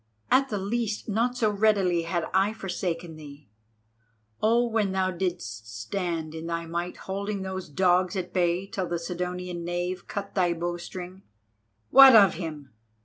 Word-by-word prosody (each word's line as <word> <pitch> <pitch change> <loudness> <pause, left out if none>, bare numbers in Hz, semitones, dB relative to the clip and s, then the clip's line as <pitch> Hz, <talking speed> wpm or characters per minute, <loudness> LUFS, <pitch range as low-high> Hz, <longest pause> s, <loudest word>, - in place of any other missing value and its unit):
At 270 +1 +4
the 210 - -2
least, 215 +2 -2
not 235 +4 0
so 220 -4 +2
readily 200 -4 +2
had 170 0 -2
I 195 +3 +3
forsaken 175 -5 -4
thee. 145 -5 -13 0.9
Oh, 235 +2 +3
when 215 -4 0
thou 190 -1 +1
didst 170 - -4
stand 165 - -3
in 160 +1 -6
thy 170 0 -3
might 170 +2 -4
holding 200 +1 -3
those 190 -2 -5
dogs 180 +3 +2
at 185 -2 -4
bay 180 0 +1
till 190 -2 -4
the 170 - -2
Sidonian 180 +1 -4
knave 175 +1 -3
cut 200 -1 -5
thy 180 -3 +2
bowstring——" 175 +2 -6 0.7
"What 270 -2 +10
of 200 -4 +7
him? 155 - -7
180 Hz, 150 wpm, -27 LUFS, 170-200 Hz, 0.9 s, What